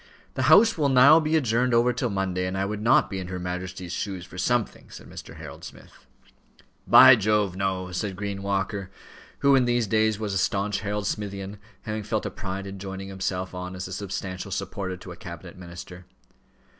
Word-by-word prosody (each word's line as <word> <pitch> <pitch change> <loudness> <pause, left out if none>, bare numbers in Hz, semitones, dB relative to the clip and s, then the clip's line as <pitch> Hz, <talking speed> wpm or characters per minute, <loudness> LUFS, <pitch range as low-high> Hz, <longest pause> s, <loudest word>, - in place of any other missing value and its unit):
"The 130 +2 0
House 210 +4 +6
will 145 -2 +3
now 135 +5 +7
be 155 0 0
adjourned 125 -3 +2
over 120 +1 +3
till 125 0 -1
Monday, 95 -2 -1
and 95 +1 -3
I 95 - 0
would 105 +1 -4
not 115 +4 +4
be 95 - -5
in 90 - -5
her 90 0 -5
Majesty's 90 0 -5
shoes 95 -4 -4
for - - -14
something," 120 +3 -1
said - - -12
Mr. - - -10
Harold - - -10
Smith. - - -13 0.8
"By 130 - +10
Jove! 105 -3 +1
no," 95 -1 -2
said 95 +1 -3
Green 100 0 -4
Walker, 100 -1 -2 0.5
who 140 0 +5
in 130 -2 +4
these 120 -1 +1
days 110 0 +2
was 105 -3 -3
a 95 - +1
stanch 100 +2 0
Harold 105 0 -3
Smithian, 100 -1 -4 0.2
having 110 0 -3
felt 105 +1 -2
a - - -3
pride 95 0 -5
in 100 0 -8
joining 95 0 -6
himself 95 -1 -3
on 90 0 -6
as 90 0 -5
a 95 - -7
substantial 95 -1 -5
support 95 -1 -4
to 90 - -9
a - - -8
cabinet 85 0 -10
minister. 90 0 -10
100 Hz, 195 wpm, -25 LUFS, 95-110 Hz, 0.8 s, By